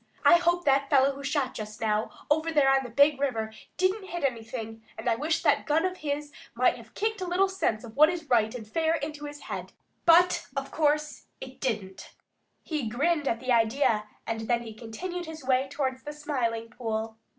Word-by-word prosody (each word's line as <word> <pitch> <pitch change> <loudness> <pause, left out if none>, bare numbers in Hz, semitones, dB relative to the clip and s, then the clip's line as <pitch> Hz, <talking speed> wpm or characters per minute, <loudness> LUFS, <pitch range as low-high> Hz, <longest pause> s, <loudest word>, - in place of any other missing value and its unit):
I 345 - +8
hope 350 0 +1
that 275 0 +3
fellow 275 -1 +5
who 280 +1 -9
shot 275 -2 0
just 215 -1 -7
now 215 0 0 0.2
over 315 +2 +2
there 280 -4 +4
on 270 - +1
the 245 - -7
Big 280 +4 +4
River 225 -6 -1 0.2
didn't 380 +2 +1
hit 345 -3 -5
anything, 225 -3 -3 0.2
and - - -6
I 235 - +4
wish 310 +6 -1
that - - +2
gun 320 +3 +2
of 370 0 -2
his 290 0 -3 0.2
might - - +3
have - - -15
kicked 435 -1 -1
a 365 - -2
little 365 +3 +3
sense 380 - -1
of 225 -2 -10
what 305 +3 +7
is 340 -3 -4
right 225 -3 +2
and 220 -4 -7
fair 320 +7 +1
into 295 -1 -5
his 290 0 -8
head, - - -6 0.3
but 345 +2 +5
of - - -3
course 300 -1 0
it 260 0 -10
didn't." 195 -6 -4 0.5
He 300 -8 -2
grinned 295 +5 +1
at 230 - 0
the 255 0 -1
idea, 230 -1 +3 0.2
and 225 -1 -3
then 240 -1 +1
he 225 -2 -8
continued 345 +11 -6
his 315 -4 -8
way 260 +1 +2
towards 265 -2 -2
the 295 - -7
Smiling 245 -7 -2
Pool. 225 -2 -3
275 Hz, 205 wpm, -28 LUFS, 230-315 Hz, 0.5 s, I